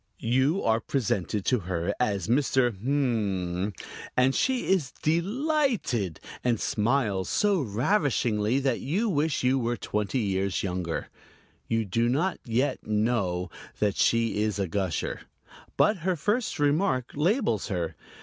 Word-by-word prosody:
You 130 +10 +1
are 110 0 +3
presented 105 -6 -1
to 125 - +2
her 85 -2 -2
as 100 -7 0
"Mr. 130 0 +2
Mmmm," 105 -6 -1 0.5
and 130 +1 +4
she 260 - +1
is 170 -10 +1
"delighted," 200 - 0 0.2
and 120 -3 +1
smiles 105 -4 0
so 205 -4 +2
ravishingly 120 - +1
that 130 -3 0
you 190 - 0
wish 155 -5 0
you 130 +1 +3
were 120 0 -1
twenty 105 +4 -2
years 100 -4 0
younger. 90 -3 -3 0.6
You 115 -1 0
do 115 +5 +1
not 165 +9 0
yet 130 +3 0
know 105 -5 0 0.3
that 105 -2 +1
she 115 -2 +2
is 105 -2 0
a 100 -2 -1
gusher. 95 -2 -2 0.6
But 210 0 +4
her 180 +2 0
first 210 - -1
remark 145 -3 +1
labels 165 - +1
her. 90 -6 -2
120 Hz, 130 wpm, -27 LUFS, 100-145 Hz, 0.6 s, and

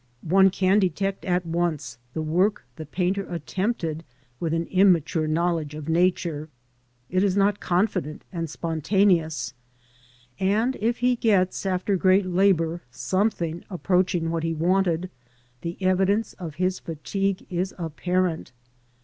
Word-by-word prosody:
One 190 +3 +5
can 190 +2 +3
detect 195 +1 -1
at 180 -1 0
once 165 -8 -2 0.2
the 160 - -1
work 180 +3 +1
the 155 +1 -8
painter 185 +5 0
attempted 170 -1 -2 0.4
with 165 -2 -1
an 165 +1 0
immature 180 -4 +3
knowledge 160 -2 0
of 155 -1 -7
Nature; 165 -2 +1 0.6
it 185 +2 +2
is 200 -1 +1
not 200 0 +3
confident 180 -4 -1
and 165 -2 -3
spontaneous, 165 - +1 0.9
and 215 +7 +1
if 230 +3 0
he 250 0 +4
gets, 195 -4 +1
after 190 +1 0
great 185 +2 +4
labour, 175 -2 +2
something 175 - -1
approach 185 0 +1
ing 165 -1 -1
what 165 -1 -1
he 165 0 -1
wanted, 180 +1 +1 0.5
the 170 +1 -5
evidence 190 +3 +1
of 165 -5 -8
his 185 +2 0
fatigue 195 +5 -3
is 180 +2 -2
apparent. 175 -2 -1
180 Hz, 130 wpm, -25 LUFS, 165-195 Hz, 0.9 s, One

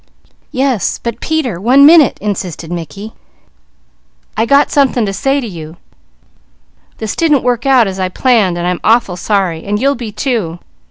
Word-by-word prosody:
"Yes, 260 - -1
but 235 0 -5
Peter, 265 - -2
one 260 +6 +5
minute," 310 -4 +6
insisted 185 -5 -5
Mickey. 175 +6 -7 1.2
"I 225 +2 0
got 280 +2 +3
something 265 -5 +2
to 195 - -3
say 270 +8 0
to 260 - -5
you. 165 -4 -9 1.2
This 220 -1 -4
didn't 300 -5 +2
work 245 0 -1
out 260 -4 +5
as 190 -1 -5
I 185 -1 -1
planned, 210 -5 +1
and 175 - -3
I'm 180 0 -1
awful 225 -5 +2
sorry, 185 -4 -1
and 205 +1 -2
you'll 275 +4 +2
be 235 -4 -7
too. 210 -8 -2
220 Hz, 160 wpm, -13 LUFS, 185-265 Hz, 1.2 s, minute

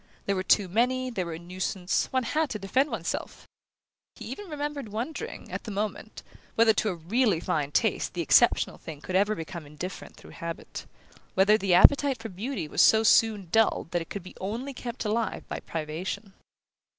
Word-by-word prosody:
There 200 - +1
were 185 - -1
too 190 +1 +3
many, 250 +6 +1
they 195 -6 -2
were 170 -2 -5
a - - -6
nuisance, 180 +1 -2
one 260 -1 +1
had 310 +6 0
to 215 - -3
defend 255 +9 +1
one's - - -4
self! - - -4 0.7
He - - -9
even 410 -3 -7
remembered 290 -5 -4
wondering, 275 - -5
at - - -5
the - - -5
moment, 210 +1 -4 0.3
whether 225 -1 +5
to 215 +1 0
a 185 - -2
really 195 +3 +1
fine 145 -3 -1
taste - - 0
the - - -1
exceptional - - +4
thing 150 -3 -9
could 185 - -4
ever 205 +3 +3
become 165 -1 -7
indifferent 175 +6 -7
through - - -14
habit; 165 0 -7 0.5
whether 195 +3 +5
the 195 -4 +2
appetite 275 +7 +6
for 225 - -7
beauty 200 - -4
was - - +1
so 220 0 +6
soon 210 -4 +4
dulled 225 -6 +2
that 175 - 0
it 165 - -8
could 200 - -6
be 185 - -11 0.4
kept 235 -1 -5
alive 220 +2 0
only - - -9
by - - -4
privation. 175 +6 -5
205 Hz, 190 wpm, -27 LUFS, 180-235 Hz, 0.7 s, appetite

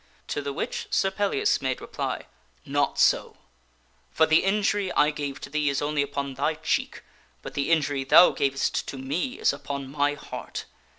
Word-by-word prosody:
To - - -2
the 140 0 -3
which 140 - -4
Sir 195 - +2
Pellias 410 - +1
made - - -1
reply, - - -4 0.4
"Not 145 0 0
so; - - +2 0.7
for 160 - +3
the 160 0 +4
injury 205 0 +1
I 150 +1 +4
gave 145 -2 -5
to - - -7
thee 150 -1 +1
is 140 0 0
only 150 0 0
upon 140 -1 -3
thy 145 +4 0
cheek, 155 0 -2 0.4
but - - -7
the 140 +1 -1
injury 145 -4 +2
thou 170 +6 +7
gavest 135 -1 -1
to 135 - -6
me 145 - -3
is - - +2
upon 140 -1 -6
my 145 0 +1
heart. - - -7
145 Hz, 175 wpm, -26 LUFS, 140-165 Hz, 0.7 s, thou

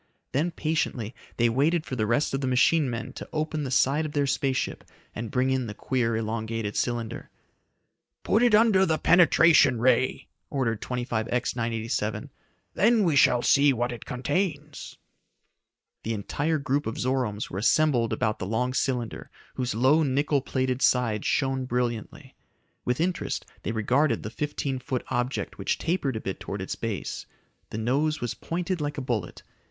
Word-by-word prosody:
Then 150 +7 +1
patiently 155 -9 -2 0.2
they 120 - +4
waited 150 +8 +1
for 130 - -4
the 110 -3 0
rest 125 +7 +1
of 135 - -1
the 130 - -1
machine 130 +3 +3
men 115 0 -5
to - - -9
open 155 -1 -2
the 135 - -3
side 135 +4 +2
of 155 -1 -5
their 145 -1 +1
space 135 -1 0
ship - - -3 0.3
and 115 0 -5
bring 130 +3 +1
in 130 -2 0
the 105 - -7
queer, 115 -3 0
elongated 110 -1 -3
cylinder. 120 -2 -2 0.9
"Put 215 - +2
it 240 -3 +5
under 215 -3 +5
the 160 -4 +2
penetration 165 -6 +5
ray!" 130 +1 +2 0.2
ordered 115 -6 -1
25X 120 -1 -2
987. 115 -1 -2 0.4
"Then 220 +1 +4
we 165 -5 +2
shall 125 -3 +4
see 140 0 +5
what 120 0 -1
it 120 - -7
contains!" 150 +3 -3 1.0
The 115 0 -2
entire 145 +10 -1
group 140 -1 -1
of 110 - -4
Zoromes 125 -5 -1
were 95 - -3
assembled 120 0 +3
about 110 -3 -1
the 95 - -4
long 125 +4 0
cylinder, 125 -4 -2 0.2
whose 125 -3 -2
low 130 +7 +4
nickel 140 0 +1
plated 130 -1 -1
sides 115 -5 +2
shone 135 -1 0
brilliantly. 120 -3 -3 0.5
With 125 +2 0
interest 175 +1 -1 0.2
they 105 - -3
regarded 125 +7 +1
the - - -5
fifteen 145 -2 -3
foot 130 0 -3
object 125 +1 -2
which - - 0
tapered 160 -7 -1
a 110 - -3
bit 95 - -4
towards 100 -1 -5
its - - -4
base. 115 -4 -4 0.4
The - - -5
nose 140 +7 0
was 120 -2 -3
pointed 175 0 -3
like 145 0 -3
a - - -1
bullet. 115 -8 -3
130 Hz, 165 wpm, -26 LUFS, 115-150 Hz, 1.0 s, it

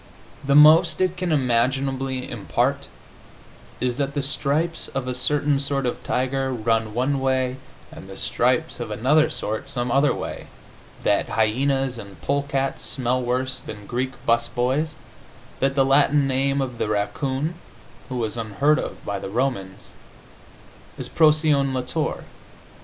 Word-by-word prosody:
The 140 0 +2
most 155 +2 +7
it 185 -1 +1
can 180 -1 -2
imaginably 130 0 0
impart - - -1 0.9
is 125 -1 -1
that 140 0 -2
the 145 - 0
stripes 150 +4 -1
of 135 -1 -4
a 125 - -1
certain 145 +2 +1
sort 140 -1 -1
of 125 - -3
tiger 130 +1 -1
run 110 -2 0
one 135 +3 +1
way 130 -1 0 0.3
and - - -11
the - - -9
stripes - - 0
of - - -4
another 150 +6 +3
sort 110 -2 -3
some 125 -3 -2
other 140 +2 +4
way, - - -5 0.6
that - - +2
hyenas 130 +3 +1
and 100 -3 -11
polecats 140 -1 -1
smell 130 -1 -1
worse 130 +2 -1
than 105 -1 -9
Greek 130 +4 -2
'bus 115 0 +2
boys, 130 +7 -1 0.6
that 135 +1 +1
the 135 -1 +4
Latin 140 +1 +4
name 135 +1 +1
of 125 -3 -4
the - - 0
raccoon 130 +9 -1 0.6
(who 130 - -4
was 115 -1 -2
unheard 115 +7 +2
of - - -6
by 100 -1 -2
the - - -6
Romans) 105 -5 -2 1.1
is - - -6
Procyon 150 -3 +3
lotor. 130 +5 -2
135 Hz, 145 wpm, -23 LUFS, 120-140 Hz, 1.1 s, most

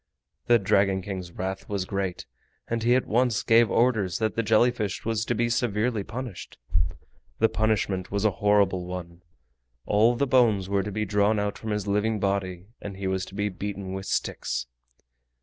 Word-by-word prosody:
The 120 - +6
Dragon 95 -2 +2
King's 95 -3 -5
wrath 95 +2 -5
was 100 -3 -1
great, 95 -2 -3 0.4
and 115 0 -2
he 120 +2 +4
at 130 - +1
once 120 0 +1
gave 115 0 +5
orders 110 -7 +2
that 110 -1 0
the 115 - 0
jelly 115 +2 +4
fish 105 -5 -4
was 110 -1 0
to 120 - 0
be 120 +2 +1
severely 115 -2 0
punished. 115 -3 -7 0.8
The 110 - +4
punishment 100 -4 0
was 100 +1 -1
a 105 - +4
horrible 100 -3 +3
one. 90 -1 -7 0.6
All 110 +4 +4
the 140 - +1
bones 115 -8 +3
were 100 0 +1
to 105 +2 -5
be 105 +2 -1
drawn 105 +2 +2
out 105 0 -1
from 110 - -6
his 105 -1 -1
living 105 +2 0
body, 95 -2 -1 0.2
and 100 -2 -7
he 100 - -5
was 95 0 -1
to 95 - -12
be 105 0 0
beaten 100 0 -5
with 95 0 -5
sticks. 60 0 -2
105 Hz, 185 wpm, -26 LUFS, 95-110 Hz, 0.8 s, The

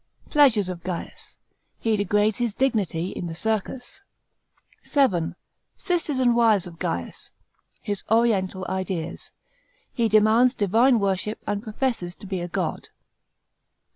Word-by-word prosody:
Pleasures 255 - +5
of 180 -2 -5
Gaius. 180 -1 -7 0.4
He 225 -1 +1
degrades 205 +2 +1
his 235 -4 -1
dignity 200 -10 0
in 175 - -5
the 165 - -6
circus. 225 - -3 0.8
§ - - -7
7. 230 - +2 0.4
Sisters 335 -6 -1
and 245 -2 +3
wives 220 -5 +4
of 170 -2 -11
Gaius. 85 0 -4 0.5
His 205 -2 -3
oriental 200 -5 +2
ideas. 185 -3 -4 0.6
He 230 -3 +1
demands 220 +4 +4
divine 230 +5 +3
worship 200 +1 -1
and 205 0 -2
professes 215 -5 -2
to - - -13
be 190 -2 -3
a 175 - -3
god. 170 - -3
210 Hz, 130 wpm, -24 LUFS, 185-240 Hz, 0.8 s, Pleasures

